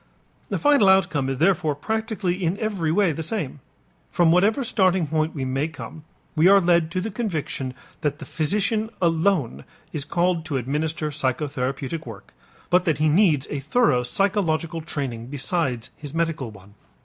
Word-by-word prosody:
The - - -1
final 285 -9 +4
outcome 175 -8 +3
is 135 - -2
therefore 160 -2 +2
practically 200 +1 -2
in 175 +3 0
every 200 -8 -1
way 190 0 +3
the 160 - -4
same. 160 - -3 0.5
From 175 -2 +4
whatever 205 +10 +3
starting 190 -7 +2
point 155 +1 -1
we 135 -3 -2
may 135 +4 -1
come, 160 -1 -10 0.3
we 160 +3 +5
are 200 +1 +7
led 170 -3 +3
to 185 +2 -2
the 220 +3 -4
conviction 155 - -3 0.3
that 145 -1 -1
the 150 - -9
physician 210 - 0
alone 165 - +1 0.3
is 150 - -3
called 170 +2 0
to 145 -4 -2
administer 150 +4 -2
psychotherapeutic 140 +1 -2
work, 110 -4 -11 0.4
but 180 0 +4
that 160 -4 +1
he 155 +1 +2
needs 155 -5 +3
a 145 - -2
thorough 150 - +2
psychological 165 - 0
training 130 -7 -5
besides 135 -3 -1
his 150 0 -8
medical 165 -7 -1
one. 100 -1 -15
160 Hz, 160 wpm, -23 LUFS, 140-185 Hz, 0.5 s, are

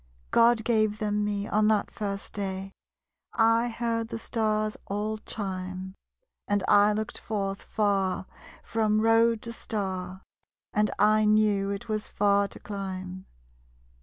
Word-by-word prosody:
_God 230 -1 +5
gave 215 -2 +2
them 210 -1 0
me, 205 0 -2
on 215 0 +2
that 215 -2 +2
first 200 -1 -5
day 195 -1 -4 0.6
I 230 +1 +4
heard 230 -1 -2
the 225 - -5
Stars 215 -2 -1
all 210 +2 -2
chime. 190 -3 -5 0.5
And 205 -1 +1
I 205 +1 +6
looked 215 +1 -3
forth 195 -2 -3
far, 195 -3 0 0.4
from 215 -1 +1
road 225 0 +4
to 230 - -6
star; 190 -4 -4 0.5
And 210 0 +2
I 215 +1 +4
knew 210 -2 +3
it 200 +3 -4
was 215 -1 -2
far 200 0 +2
to - - -12
climb. 190 -2 -6
210 Hz, 135 wpm, -27 LUFS, 195-220 Hz, 0.6 s, I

